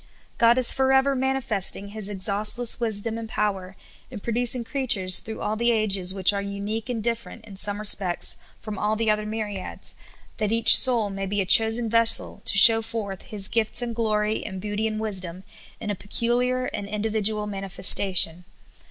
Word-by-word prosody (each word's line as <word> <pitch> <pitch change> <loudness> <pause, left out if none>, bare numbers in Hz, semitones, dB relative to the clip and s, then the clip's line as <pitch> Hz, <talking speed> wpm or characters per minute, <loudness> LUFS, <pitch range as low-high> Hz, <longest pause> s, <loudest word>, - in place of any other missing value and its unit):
God 235 +1 +3
is 255 -2 +7
forever 265 +1 0
mani 265 +1 -2
festing 200 -3 +1
His 210 -1 -6
exhaustless 210 +5 0
wisdom 225 0 -1
and 225 -1 -9
power 195 -3 -4 0.3
in 240 - -10
producing 240 +2 -1
creatures 225 -8 +2
through 220 - -9
all 215 - -4
the 235 +2 0
ages 200 -5 -1
which 190 0 +1
are 200 - -4
unique 200 +3 -7
and 230 -3 -5
different 235 -1 -6
in 205 -3 -13
some 205 +1 +2
respects 200 -4 +3 0.2
from 215 -2 -9
all 210 +1 -2
the 220 0 -1
other 210 0 -3
mj^riads, 210 -3 -8 0.4
that 215 -2 -3
each 230 0 +8
soul 230 -5 +3
may 195 0 -6
be 205 +1 -4
a 195 - -2
chosen 225 +4 +2
vessel 230 -2 +2
to - - +2
show 225 +2 +8
forth 220 -4 -7
His 210 -5 -1
gifts 225 +1 0
and 235 -1 -6
glory 215 -1 -2
and 190 -2 -8
beauty 210 +2 -4
and 215 -1 -6
wisdom 185 -4 -4 0.4
in 210 - -6
a - - -5
pecu 230 +5 -4
liar 250 +1 -2
and 200 - -7
individual 210 0 -3
manifestation. 190 -3 +1
215 Hz, 180 wpm, -22 LUFS, 200-230 Hz, 0.4 s, each